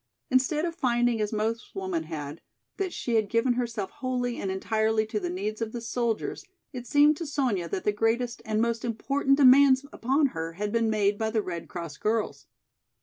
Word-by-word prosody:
Instead 270 +5 +2
of 335 - -2
finding 240 -6 +1
as 210 - -1
most 220 +1 -2
women 185 -4 -2
had, 155 -1 -6 0.4
that 390 -2 -2
she 240 - -3
had 215 -3 +2
given 230 +3 +2
herself 235 -5 -3
wholly 250 -2 -2
and 195 - -3
entirely 220 +3 +1
to 215 0 -3
the 180 -3 -3
needs 205 +5 -4
of 220 -1 -3
the 240 - -3
soldiers, 230 - -2 0.3
it 245 -1 -7
seemed 295 +1 +5
to 330 +1 -5
Sonya 245 - -1
that 185 - -3
the 210 - +2
greatest 225 +3 0
and 215 -2 -1
most 230 0 0
important 275 +4 +1
demands 270 0 +6
upon 275 +4 +2
her 165 0 -4
had 205 +4 -3
been 230 0 +1
made 205 -1 +1
by 220 0 0
the 220 -1 0
Red 170 -2 -5
Cross 170 -5 -7
girls. 220 +1 -2
225 Hz, 195 wpm, -27 LUFS, 205-255 Hz, 0.4 s, demands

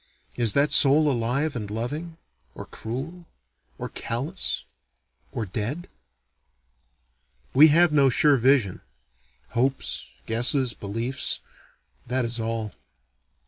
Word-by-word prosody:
Is 115 -4 +3
that 140 +1 +2
soul 150 +1 +6
alive 130 +5 -1
and 105 -4 -5
loving? 150 +10 -5 0.4
or - - -8
cruel? 155 +10 -7 0.5
or - - -5
callous? 140 +11 -3 0.7
or 115 - -3
dead? 115 - -4 1.7
We 150 +4 +8
have 170 +2 +4
no 140 -2 +5
sure 145 +3 +3
vision. 125 -6 +2 0.7
Hopes, 135 +3 -1 0.2
guesses, 120 +2 +1
beliefs 115 +6 -1 0.7
that 125 0 0
is 115 0 -4
all. 115 -1 -3
130 Hz, 100 wpm, -25 LUFS, 115-150 Hz, 1.7 s, We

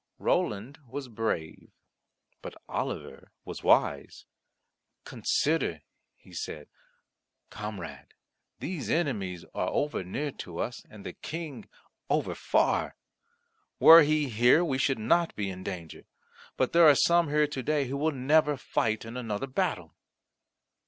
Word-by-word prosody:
Roland 110 +8 -1
was 135 +2 -6
brave, 110 -9 -4 0.7
but - - -9
Oliver - - -5
was - - -7
wise. - - +1 0.8
"Consider," 140 - 0 0.3
he - - -19
said, 75 - -6 0.8
"comrade. 95 - -8 0.4
These 170 -6 -5
enemies 100 - -1
are - - -1
over 145 -9 -1
near 140 +11 -3
to 85 -2 -9
us, 120 - -4
and 105 -2 -13
the - - -5
King 160 +4 -7 0.4
over - - 0
far. - - +1 0.8
Were 165 +1 +10
he 150 -1 +2
here, 120 +8 +4
we 135 -5 -1
should 135 0 +1
not 165 +10 +1
be 100 -2 -3
in 90 0 -8
danger; 90 -5 -7 0.5
but 130 - 0
there 170 -1 +7
are 145 - +6
some 170 0 +3
here 150 +1 +3
to 145 -2 -5
day 145 +2 0
who 130 +2 -4
will 155 +3 +1
never 145 +2 +2
fight 110 -3 -1
in 115 +1 -8
another 115 -1 -3
battle." 130 -1 -2
130 Hz, 130 wpm, -28 LUFS, 105-150 Hz, 0.8 s, Were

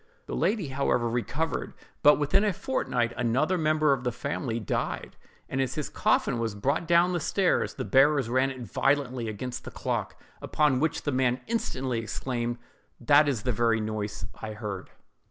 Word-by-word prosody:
The - - -6
lady, 205 -9 0
however, 130 -3 +1
recovered; 130 +7 -2 0.3
but, 150 - +7
within 150 +8 +2
a 210 -2 +2
fortnight, 125 - -1
another 130 +9 +1
member 155 -3 +3
of 130 -2 -3
the 125 - 0
family 125 -2 -3
died: 105 - -3 0.3
and 135 - -1
as 130 -1 -1
his 150 - -3
coffin 120 - +1
was 115 -2 -2
brought 140 +10 -1
down 170 +2 +4
the 175 - 0
stairs, 185 +3 +1
the 130 - -4
bearers 140 -1 +4
ran 130 +3 +2
it 130 -2 -7
violently 130 -2 0
against 120 +4 -5
the - - -7
clock—upon 150 -4 -1
which 160 +2 0
the 145 - 0
man 130 -1 +1
instantly 130 - -2
exclaimed, 120 +1 -3 0.4
"That 145 +4 +5
is 130 -7 -1
the 125 - +1
very 115 0 +2
noise 105 -3 -3 0.2
I 110 -1 -5
heard!" 105 -3 -6
130 Hz, 170 wpm, -27 LUFS, 120-150 Hz, 0.4 s, but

